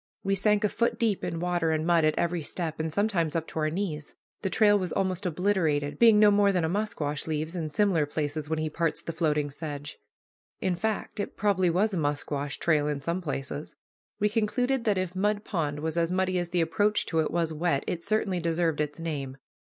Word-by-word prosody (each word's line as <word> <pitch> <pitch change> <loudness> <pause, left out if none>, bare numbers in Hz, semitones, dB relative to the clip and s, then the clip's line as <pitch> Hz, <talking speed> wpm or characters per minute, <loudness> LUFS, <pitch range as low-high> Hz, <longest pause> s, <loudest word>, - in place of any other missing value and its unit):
We 195 - +1
sank 210 +2 +2
a 210 - +3
foot 235 +3 0
deep 220 -4 0
in 170 -2 -2
water 175 -1 0
and 155 0 0
mud 170 -2 +4
at 155 - +1
every 170 0 0
step, 160 +1 -4
and 160 0 -1
sometimes 180 -4 0
up 165 -1 0
to - - -4
our 155 0 +1
knees. 155 -4 -4 0.3
The 190 - -1
trail 205 0 +4
was 180 -3 -3
almost 185 -1 0
obliterated, 165 -5 0
being 230 -2 +7
no 210 0 +7
more 200 0 +4
than 180 -3 +1
a - - 0
musquash 165 -8 -2
leaves 155 +2 -2
in 160 -3 -2
similar 165 -2 +2
places 150 0 -3
when 160 - 0
he 155 0 -1
parts 165 +1 -1
the - - -3
floating 150 -3 0
sedge. 145 -1 -6 0.6
In 185 - 0
fact, 220 +2 -3
it 205 - -4
probably 190 -4 +2
was 200 +5 +1
a - - 0
musquash 145 -1 -2
trail 150 -3 +2
in 150 -1 -1
some 170 +6 -2
places. 145 -2 -5 0.4
We 210 - +3
concluded 235 +4 0
that 210 -3 +2
if 185 -1 -2
Mud 205 +2 0
Pond 150 -6 -2
was 160 +1 -2
as 170 0 +1
muddy 185 0 +1
as 175 -1 -3
the 175 -1 +1
approach 205 +6 +1
to 165 - 0
it 155 - +1
was 165 -1 0
wet, 155 -3 0
it 170 - -3
certainly 200 -2 0
deserved 165 -2 0
its 150 -1 -3
name. 145 -5 -4
170 Hz, 215 wpm, -28 LUFS, 155-200 Hz, 0.6 s, being